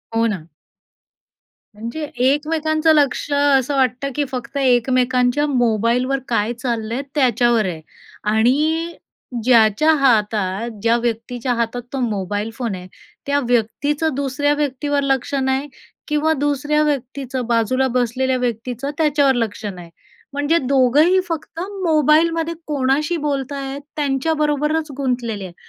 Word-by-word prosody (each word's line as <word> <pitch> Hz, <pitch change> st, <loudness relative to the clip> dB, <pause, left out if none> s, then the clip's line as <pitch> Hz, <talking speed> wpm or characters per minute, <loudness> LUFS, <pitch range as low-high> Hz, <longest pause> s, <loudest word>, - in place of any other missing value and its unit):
हो 230 Hz, 0 st, +3 dB
ना. 180 Hz, -7 st, -4 dB, 1.3 s
म्हणजे 230 Hz, +8 st, -5 dB
एकमेकांचं 310 Hz, +4 st, +2 dB
लक्ष 290 Hz, -1 st, +1 dB
असं 285 Hz, -1 st, +2 dB
वाटतं, 260 Hz, +1 st, 0 dB
की 295 Hz, -, +1 dB
फक्त 255 Hz, +2 st, -5 dB
एकमेकांच्या 255 Hz, +1 st, +2 dB
मोबाईलवर 245 Hz, +1 st, +1 dB
काय 230 Hz, 0 st, 0 dB
चाललंय 235 Hz, 0 st, -2 dB
त्याच्यावर 240 Hz, -4 st, +3 dB
आहे 170 Hz, -4 st, -4 dB, 0.5 s
आणि 310 Hz, +9 st, +2 dB, 0.5 s
ज्याच्या 230 Hz, +4 st, +4 dB
हातात, 215 Hz, -5 st, +1 dB
ज्या 230 Hz, +2 st, +3 dB
व्यक्तीच्या 240 Hz, +1 st, -2 dB
हातात 235 Hz, +1 st, -2 dB
तो 270 Hz, -, -2 dB
मोबाईल 205 Hz, -2 st, -2 dB
फोन 230 Hz, -4 st, -3 dB
आहे, 180 Hz, 0 st, -9 dB, 0.4 s
त्या 285 Hz, 0 st, +1 dB
व्यक्तीचं 285 Hz, +7 st, 0 dB
दुसऱ्या 280 Hz, +1 st, 0 dB
व्यक्तीवर 290 Hz, 0 st, -1 dB
लक्ष 270 Hz, -1 st, -1 dB
नाही 265 Hz, +2 st, 0 dB, 0.4 s
किंवा 300 Hz, +1 st, +1 dB
दुसऱ्या 290 Hz, +1 st, 0 dB
व्यक्तीचं, 265 Hz, -3 st, -2 dB
बाजूला 240 Hz, +3 st, +1 dB
बसलेल्या 255 Hz, +1 st, 0 dB
व्यक्तीचं 245 Hz, +2 st, -3 dB
त्याच्यावर 290 Hz, -3 st, +3 dB
लक्ष 220 Hz, -2 st, -2 dB
नाही. 180 Hz, -4 st, -7 dB, 0.4 s
म्हणजे 290 Hz, +4 st, +1 dB
दोघंही 280 Hz, +6 st, +3 dB
फक्त 330 Hz, -1 st, -5 dB
मोबाईलमध्ये 330 Hz, -3 st, +2 dB
कोणाशी 295 Hz, +3 st, 0 dB
बोलत 285 Hz, -3 st, -2 dB
आहेत, 275 Hz, 0 st, -5 dB
त्यांच्याबरोबरच 300 Hz, +2 st, 0 dB
गुंतलेले 245 Hz, -6 st, -2 dB
आहे 180 Hz, -, -10 dB
265 Hz, 115 wpm, -20 LUFS, 235-295 Hz, 1.3 s, ज्याच्या